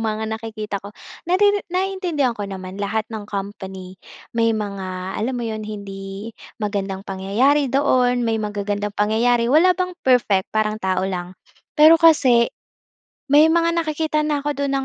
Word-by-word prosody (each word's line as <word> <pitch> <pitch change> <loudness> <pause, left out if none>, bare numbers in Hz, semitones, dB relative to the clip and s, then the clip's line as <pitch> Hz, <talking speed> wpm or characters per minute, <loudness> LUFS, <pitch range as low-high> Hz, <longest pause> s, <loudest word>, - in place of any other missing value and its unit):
mga 220 -1 -2
nakikita 215 -3 -5
ko. 200 - -9 0.4
Nariri 405 +2 +3
naiintindihan 360 -8 -1
ko 205 -1 -5
naman 190 0 -7
lahat 215 +2 -1
ng 210 -1 -6
company, 190 -2 -7 0.3
may 230 -1 +2
mga 190 -2 -5
alam 250 +4 -1
mo 240 - -3
'yon 220 -1 -4
hindi 200 0 -7 0.3
magandang 200 -2 -3
pangyayari 235 +10 +1
doon, 250 -2 +2
may 225 -1 0
magagandang 205 0 -3
pangyayari. 235 +3 +2
Wala 355 +3 +5
bang 365 -1 -2
perfect, 235 -7 +2
parang 215 0 0
tao 185 0 0
lang. 180 -1 -5 0.4
Pero 315 +2 +7
kasi, 260 -8 +5 0.8
may 300 +2 +7
mga 335 0 +2
nakikita 310 -1 0
na 295 -1 0
ako 295 0 -2
doon 280 0 -2
220 Hz, 145 wpm, -21 LUFS, 200-290 Hz, 0.8 s, Pero